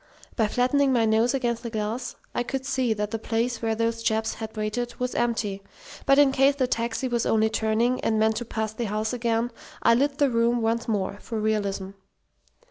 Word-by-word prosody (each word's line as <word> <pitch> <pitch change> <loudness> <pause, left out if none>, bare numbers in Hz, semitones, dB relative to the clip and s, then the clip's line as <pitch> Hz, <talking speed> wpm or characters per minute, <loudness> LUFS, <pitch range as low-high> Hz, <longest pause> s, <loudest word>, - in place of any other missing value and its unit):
By 220 -3 +2
flattening 260 +4 +2
my 235 -3 +3
nose 225 +4 +3
against 240 -3 -1
the 235 - -5
glass 220 +3 -3 0.2
I - - 0
could 265 +2 -3
see 260 -3 0
that 210 0 -3
the 225 - -2
place 230 +1 -1
where 225 -1 0
those 230 0 -1
chaps 220 0 0
had 220 0 -7
waited 225 +3 -2
was 250 0 -1
empty; 225 -4 -1 0.5
but 275 0 +6
in 285 -2 +6
case 275 +1 +4
the 265 -2 +1
taxi 235 +1 -1
was 240 -2 0
only 220 0 +2
turning, 225 +3 +1
and 220 - +1
meant 220 0 +2
to 240 - -3
pass 220 -1 -3
the 235 +2 -3
house 215 +2 -2
again, 235 0 0 0.3
I 230 - +6
lit 280 +4 +1
the 285 -3 +3
room 235 0 +2
once 230 +1 0
more, 200 -2 -1
for 225 -2 -4
realism. 200 -3 -1
230 Hz, 205 wpm, -25 LUFS, 220-245 Hz, 0.5 s, but